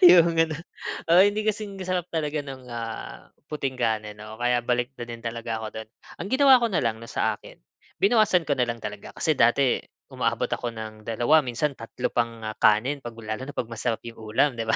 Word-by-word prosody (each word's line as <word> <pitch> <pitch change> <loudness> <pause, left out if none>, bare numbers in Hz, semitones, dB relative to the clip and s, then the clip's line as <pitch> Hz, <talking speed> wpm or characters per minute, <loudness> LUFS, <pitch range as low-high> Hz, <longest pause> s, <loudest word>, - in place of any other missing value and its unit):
yung 170 -1 +7
ganon. 165 -2 +2 0.5
Oo, 175 +2 +8
hindi 205 +1 +2
kasing 210 -2 -2
sarap 180 -1 -1
talaga 150 -2 -1
ng, 135 -2 -9
ah, 115 -1 -6 0.2
puting 135 -4 -3
kanin, 110 -3 -1
oo. 110 +1 -8
Kaya 120 0 +2
balik 120 +1 0
na 120 - -5
din 115 -1 -8
talaga 115 -1 -3
ako 110 - -4
do'n. 110 0 -7 0.3
Ang 180 - -4
ginawa 265 -1 +7
ko 235 - +3
na 175 - +1
lang 110 -1 0
na 115 - -10
sa - - +1
akin, - - -14 0.4
binawasan 205 -4 +4
ko 145 - +2
na 125 - +3
lang 115 - -3
talaga. 105 -1 -7
Kasi 155 - +2
dati, 125 +2 +4 0.3
umaabot - - -1
ako 120 - -1
ng 110 -1 -7
dalawa 120 +7 +4
minsan 130 +2 -1
tatlo 125 0 -4
pang 115 -1 -1
ah 110 - -3
kanin, 125 +7 +4
'pag 120 -2 -8
lalo 110 +1 -4
na 145 - -8
pag 120 - -1
masarap 115 0 -1
yung 115 -1 -9
ulam, 110 +6 +2
di 115 - -2
ba? 110 - +3
120 Hz, 210 wpm, -26 LUFS, 115-160 Hz, 0.5 s, Oo